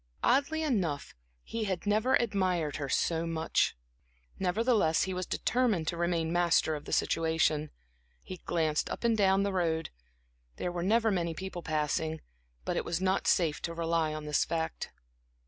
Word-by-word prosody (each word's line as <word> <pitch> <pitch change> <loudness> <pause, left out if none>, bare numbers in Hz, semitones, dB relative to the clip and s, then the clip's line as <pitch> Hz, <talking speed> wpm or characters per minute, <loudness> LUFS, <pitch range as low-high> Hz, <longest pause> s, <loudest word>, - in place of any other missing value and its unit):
Oddly 285 +5 +2
enough, 185 - -1 0.3
he 225 -1 -3
had 190 -2 -3
never 215 +5 +3
admired 185 -9 0
her 140 -3 -4
so 165 +3 +1
much. 160 - 0 0.6
Nevertheless, 195 -3 +2
he 190 - -2
was 185 -1 -3
determined 225 -10 0
to 175 - -3
remain 170 -1 0
master 170 -2 +3
of 150 -1 -6
the - - -7
situation. 160 -2 +1 0.5
He 185 - -7
glanced 160 -3 0
up - - -5
and 230 -1 +3
down 195 -2 +3
the 200 -1 -1
road; 165 -3 0 0.6
there 180 - -3
were 175 0 -3
never 220 +4 +3
many 170 -4 -1
people 190 0 -6
passing, 155 0 -1 0.5
but - - -1
it - - 0
was 170 0 -2
not 190 +1 0
safe 160 -4 +2
to 165 - -4
rely 165 -1 0
on 155 0 -5
this 150 -1 +2
fact. 160 -1 -3
175 Hz, 165 wpm, -30 LUFS, 160-195 Hz, 0.6 s, never